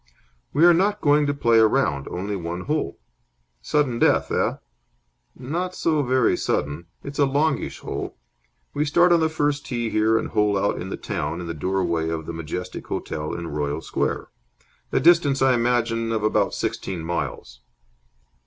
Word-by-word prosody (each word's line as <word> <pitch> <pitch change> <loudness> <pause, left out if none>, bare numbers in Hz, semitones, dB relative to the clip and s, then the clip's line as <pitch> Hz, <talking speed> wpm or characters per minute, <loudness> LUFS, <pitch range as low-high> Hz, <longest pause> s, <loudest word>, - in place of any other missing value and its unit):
"We 155 +5 +4
are 175 - +8
not 200 +4 +2
going 145 -2 +3
to 145 - +1
play 115 -4 +4
a 110 - +7
round. 90 - 0
Only 100 +3 -3
one 85 -1 -4
hole." 150 +8 -2 0.6
"Sudden 125 - 0
death, - - +3
eh?" - - +1 0.8
"Not 175 +8 -3
so 155 -2 +1
very 130 -3 +2
sudden. 75 +4 -2 0.2
It's 140 +1 -7
a 140 - +5
longish 145 +2 0
hole. - - -5 0.6
We 145 - 0
start 175 +4 +4
on 170 - +5
the 160 0 +2
first 145 -2 0
tee 120 -3 -3
here 110 +1 +3
and - - -2
hole 105 -2 +2
out 100 - 0
in 95 - -5
the - - -4
town 85 - -3
in 90 - -5
the 85 - -4
doorway 85 0 -1
of 80 -1 -3
the 85 - -5
Majestic 80 +3 -6
Hotel 75 -1 -4
in 85 -1 -5
Royal 75 0 -2
Square. - - -2 0.6
A - - +2
distance, 160 -5 +4
I 135 -1 +5
imagine, 115 -1 +1
of 110 -2 -1
about 110 - +1
sixteen 90 -4 -3
miles." 85 -7 -4
115 Hz, 170 wpm, -23 LUFS, 85-145 Hz, 0.8 s, are